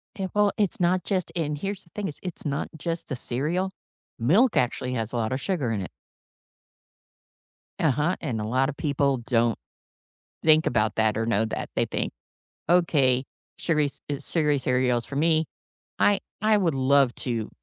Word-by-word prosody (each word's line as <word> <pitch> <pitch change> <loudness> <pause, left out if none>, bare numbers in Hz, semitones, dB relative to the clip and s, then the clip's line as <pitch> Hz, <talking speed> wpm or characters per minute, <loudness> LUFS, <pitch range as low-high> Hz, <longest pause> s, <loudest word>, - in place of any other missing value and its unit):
It 190 -2 -4
well, 205 -1 +3
it's 205 -4 0
not 180 +1 +2
just 185 -3 -1
and 150 -3 -1
here's 195 +4 -4
the 170 - -24
thing 205 -2 -2
is 145 - -7
it's 180 - -6
not 140 0 -2
just 165 +2 -4
the 135 - -2
cereal, 160 +11 -1 0.5
milk 195 - +4
actually 125 +1 0
has 115 -1 -3
a - - -2
lot 110 +1 -1
of 130 - -1
sugar 165 - -1
in 105 -3 -1
it. 90 - -6 1.9
Uh-huh, 150 +4 +2
and 120 -8 -2
a - - -2
lotta 130 +5 +1
people 140 -2 +1
don't 115 -1 +1 0.9
think 155 0 +5
about 110 -3 +1
that 110 -1 +2
or 115 - 0
know 110 -1 +2
that. - - -4
They - - +3
think, - - -3 0.6
"Okay, 140 -7 +3 0.3
sugary 150 -3 +1
ce - - -11 0.3
sugary 150 -4 +2
cereal's 125 -2 +1
for 140 - -8
me." 160 +1 +3 0.5
I 205 -1 +4 0.2
I 215 0 +4
would 170 -6 +1
love 135 -1 +3
to, 115 -4 -3
145 Hz, 170 wpm, -26 LUFS, 125-175 Hz, 1.9 s, think